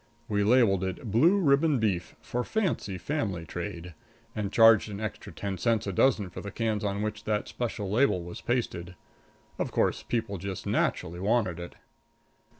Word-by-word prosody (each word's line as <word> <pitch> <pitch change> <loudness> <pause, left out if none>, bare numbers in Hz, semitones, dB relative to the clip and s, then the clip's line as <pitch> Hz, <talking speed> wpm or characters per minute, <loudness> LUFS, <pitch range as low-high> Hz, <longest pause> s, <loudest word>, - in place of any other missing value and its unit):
We 105 -3 +1
labeled 105 -4 +4
it 95 +4 -4
"Blue 165 - +5
Ribbon 150 -3 +3
Beef 100 -7 -1
For 120 +1 -2
Fancy 180 - -1
Family 95 - -2
Trade," 90 0 -6 0.4
and 105 -3 -2
charged 115 -1 +6
an 100 -1 -6
extra 110 -2 -5
ten 100 -2 -4
cents 115 +2 +1
a 100 - -3
dozen 105 -3 +2
for - - -7
the 100 - -6
cans 110 0 -1
on 100 0 -1
which 105 0 -4
that 105 -1 0
special 110 -4 -3
label 105 -3 +2
was 85 0 -8
pasted. 95 -8 -2 0.6
Of - - -1
course, - - +1
people 110 -5 -2
just 95 +1 -5
naturally 85 +2 0
wanted 100 -3 +1
it. 85 - -8
105 Hz, 165 wpm, -28 LUFS, 95-115 Hz, 0.6 s, charged